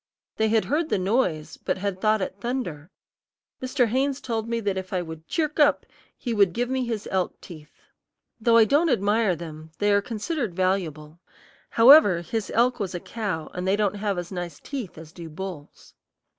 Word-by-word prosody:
They 220 0 +2
had 220 0 +2
heard 310 +3 0
the - - +2
noise, 185 -6 0
but - - -2
had 190 -1 -3
thought 215 -2 +2
it 190 - -5
thunder. 200 - -4 0.7
Mr. 255 0 +1
Haynes 265 +4 0
told 225 -2 -3
me 235 0 0
that 200 -3 -1
if 190 -1 -5
I 180 -1 0
would 160 -1 -9
"chirk 310 -2 -1
up" 295 -1 +4 0.3
he 240 - -3
would 200 -5 +3
give 245 +4 -1
me 260 -1 0
his 225 -3 -4
elk 185 -1 -1
teeth. 155 -3 -13 0.6
Though 230 +1 +4
I 225 - +7
don't 295 +9 +3
admire 210 -4 +2
them, 160 -1 -9
they 205 0 +2
are 200 - +4
considered 230 - -3
valuable; 170 -4 -1 0.5
however, 230 - +7
his 205 +5 -3
elk 245 +2 +3
was 190 -3 -3
a - - -2
cow, 195 -7 -4
and 180 +1 -4
they 195 - +3
don't 205 -1 0
have 200 -2 -1
as 175 +1 -5
nice 175 -4 -5
teeth 255 - -6
as 160 -1 -11
do 170 -1 -9
bulls. 175 -2 -9
205 Hz, 190 wpm, -25 LUFS, 175-235 Hz, 0.7 s, I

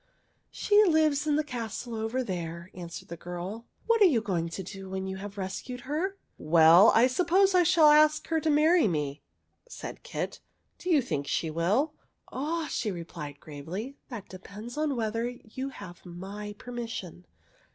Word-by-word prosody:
'' - - -43
She 420 0 +4
lives 310 -5 +3
in 295 - +3
the 305 - +2
castle 240 -3 -5
over 225 +3 -1
there," 170 -3 -5
an 175 -1 -7
swered 170 - -9
the 170 - -5
girl. 180 +7 -6
" - - -40
What 460 -1 +3
are - - +9
you 290 -11 +4
going 180 -6 -2
to 190 +3 -5
do 195 +1 -9
when 190 0 -3
you 190 0 -4
have 200 +1 -8
rescued 200 +6 -5
her?" 325 +9 -2
'' - - -45
Well, 165 +5 +7
I 230 - +7
suppose 365 +8 +3
I 365 - +6
shall 335 -3 +6
ask 305 0 +5
her 325 -1 +2
to 315 - 0
marry 310 0 +5
me," 150 -4 -2 0.5
said - - -8
Kit. - - -4 0.2
'' - - -46
Do 365 - -5
you 300 -6 +4
think 145 - -3
she 160 +2 -1
will? 205 - +1
" - - -44
'' - - -23
Ah," 315 +5 -2
she 225 - -2
replied 165 -5 -7
gravely, 170 - -7
" - - -46
that 230 -6 -7
depends 205 +5 -9
on 300 -2 0
whether 230 +1 -1
you 245 +2 -7
have 195 -9 -11
my 195 +4 -7
permission. 230 -8 -7
225 Hz, 195 wpm, -28 LUFS, 180-300 Hz, 0.5 s, are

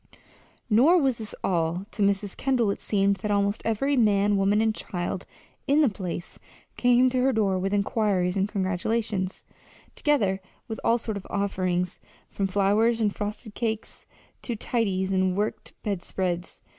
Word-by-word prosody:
Nor 265 +11 +5
was 265 -6 +1
this 215 -2 -6
all. 170 +1 0
To 210 - -5
Mrs. 200 0 +1
Kendall 250 -6 +1
it - - -4
seemed 200 -1 +1
that 210 +3 -4
almost 200 0 +1
every 250 +6 +1
man, 205 -4 +3
woman, 200 +2 +3
and 220 0 +2
child 180 -2 -4 0.4
in 290 +3 +4
the 285 - +5
place 180 -3 -6 0.4
came 245 +1 +4
to 255 - +1
her 265 +1 +3
door 200 -5 +1
with 195 +1 -1
inquiries 200 -3 +1
and 195 +1 +1
congratulations, 195 0 -1 0.5
together 205 -11 +1 0.3
with 220 - -5
all 230 - +4
sorts 220 -3 -4
of 195 - -14
offerings, 185 -2 -1 0.3
from 195 - -1
flowers 205 +4 +2
and 210 -3 +1
frosted 210 +1 -5
cakes 220 -1 -4 0.3
to 240 - -3
tidies 195 -5 -1
and 185 -1 +1
worked 210 +1 -3
bedspreads. 180 -3 -3
205 Hz, 155 wpm, -26 LUFS, 190-225 Hz, 0.5 s, Nor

